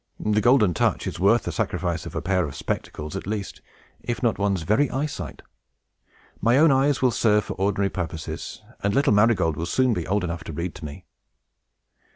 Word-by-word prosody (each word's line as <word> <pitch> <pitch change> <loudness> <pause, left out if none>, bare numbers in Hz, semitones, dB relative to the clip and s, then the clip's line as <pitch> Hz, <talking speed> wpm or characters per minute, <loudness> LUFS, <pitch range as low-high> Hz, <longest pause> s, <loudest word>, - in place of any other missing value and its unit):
The 105 0 +1
Golden 110 -5 +4
Touch - - 0
is - - -4
worth - - +4
the - - -3
sacrifice 85 -3 -2
of - - -9
a - - -3
pair 90 -2 +1
of 70 - -8
spectacles, 75 +2 -4
at - - -5
least, 105 -2 -4 0.4
if 120 +1 -4
not 120 - +4
of - - -16
one's 100 -4 0
very 110 - +2
eyesight. 145 +3 -4 1.0
My 115 +3 +4
own 155 +1 +6
eyes 135 0 +2
will 125 - +4
serve 105 -2 +3
for - - -4
ordinary 100 +1 0
purposes, 80 -3 -5 0.2
and 100 0 0
little 140 -4 +3
Marygold 105 -7 +3
will 85 - -3
soon 130 -2 +2
be 85 -6 -3
old 100 0 0
enough 85 -1 -4
to 80 - -6
read 85 +3 -3
to - - -9
me." 70 -1 -9
100 Hz, 195 wpm, -24 LUFS, 85-120 Hz, 1.0 s, own